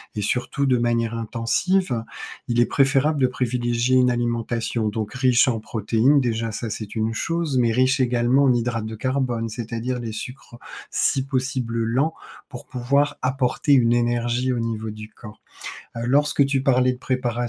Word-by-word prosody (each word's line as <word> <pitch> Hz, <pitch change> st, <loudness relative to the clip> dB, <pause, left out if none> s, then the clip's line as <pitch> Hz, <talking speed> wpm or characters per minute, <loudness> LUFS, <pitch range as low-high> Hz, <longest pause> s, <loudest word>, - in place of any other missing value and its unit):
et 105 Hz, -, -2 dB
surtout 125 Hz, +6 st, -1 dB
de 130 Hz, -2 st, +3 dB
manière 115 Hz, -1 st, 0 dB
intensive, 115 Hz, -, 0 dB, 0.4 s
il 120 Hz, -1 st, 0 dB
est -, -, +5 dB
préférable 140 Hz, +2 st, +2 dB
de 130 Hz, -, +4 dB
privilégier 125 Hz, 0 st, 0 dB
une 125 Hz, -1 st, +4 dB
alimentation 120 Hz, -1 st, -1 dB
donc 105 Hz, 0 st, -3 dB
riche 125 Hz, -1 st, +3 dB
en 115 Hz, -3 st, -1 dB
protéines, 115 Hz, +6 st, +2 dB
déjà 115 Hz, -2 st, -1 dB
ça 115 Hz, -, -4 dB
c'est 105 Hz, +1 st, -6 dB
une 110 Hz, +1 st, -1 dB
chose, 165 Hz, 0 st, -1 dB
mais 120 Hz, -2 st, +3 dB
riche 130 Hz, +2 st, +2 dB
également 125 Hz, +2 st, +2 dB
en 130 Hz, -, +4 dB
hydrates 115 Hz, -2 st, -1 dB
de 110 Hz, 0 st, -6 dB
carbone, 125 Hz, -2 st, -1 dB
c'est-à-dire 120 Hz, +2 st, -4 dB
les 115 Hz, -2 st, -5 dB
sucres, 120 Hz, +2 st, -8 dB, 0.3 s
si 135 Hz, -1 st, +1 dB
possible 130 Hz, -4 st, -2 dB
lents, 135 Hz, +8 st, +1 dB, 0.4 s
pour 125 Hz, -4 st, -10 dB
pouvoir 140 Hz, +4 st, 0 dB
apporter 130 Hz, +2 st, +1 dB
une 120 Hz, -3 st, +4 dB
énergie 120 Hz, +1 st, 0 dB
au 120 Hz, -, -2 dB
niveau 110 Hz, -1 st, -3 dB
du 110 Hz, +1 st, -9 dB
corps. 105 Hz, -1 st, -13 dB, 0.6 s
Heu, 115 Hz, -, -4 dB
lorsque 145 Hz, +1 st, +3 dB
tu 135 Hz, -1 st, 0 dB
parlais 130 Hz, -1 st, +3 dB
de 125 Hz, -, -9 dB
préparation, 125 Hz, -2 st, -2 dB
120 Hz, 170 wpm, -23 LUFS, 115-130 Hz, 0.6 s, est